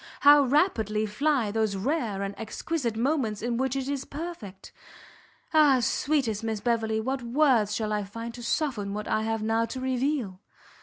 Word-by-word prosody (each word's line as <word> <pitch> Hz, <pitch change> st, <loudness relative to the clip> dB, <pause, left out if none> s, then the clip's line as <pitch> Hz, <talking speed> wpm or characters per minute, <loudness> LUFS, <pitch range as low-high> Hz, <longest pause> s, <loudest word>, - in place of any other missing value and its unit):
How 290 Hz, +1 st, +8 dB
rapidly 240 Hz, -, +1 dB
fly 250 Hz, 0 st, 0 dB
those 220 Hz, -2 st, 0 dB
rare 215 Hz, -3 st, -1 dB
and 200 Hz, 0 st, -3 dB
exquisite 235 Hz, +2 st, -3 dB
moments 235 Hz, -5 st, 0 dB
in 240 Hz, 0 st, -1 dB
which 265 Hz, +1 st, 0 dB
it 270 Hz, -1 st, -2 dB
is 280 Hz, -1 st, -2 dB
perfect! 280 Hz, -, -8 dB, 0.8 s
Ah! 295 Hz, -4 st, +6 dB
sweetest 245 Hz, -4 st, 0 dB
Miss 220 Hz, -2 st, -2 dB
Beverley, 220 Hz, 0 st, 0 dB
what 260 Hz, +4 st, -2 dB
words 240 Hz, -4 st, +2 dB
shall 215 Hz, -1 st, -2 dB
I 210 Hz, -1 st, -1 dB
find 230 Hz, +4 st, -7 dB
to 240 Hz, -, -9 dB
soften 230 Hz, -6 st, -1 dB
what 210 Hz, 0 st, -5 dB
I 215 Hz, -, +1 dB
have 225 Hz, 0 st, -2 dB
now 225 Hz, +1 st, +1 dB
to 245 Hz, +3 st, -6 dB
reveal! 255 Hz, -6 st, -1 dB
230 Hz, 165 wpm, -27 LUFS, 215-275 Hz, 0.8 s, How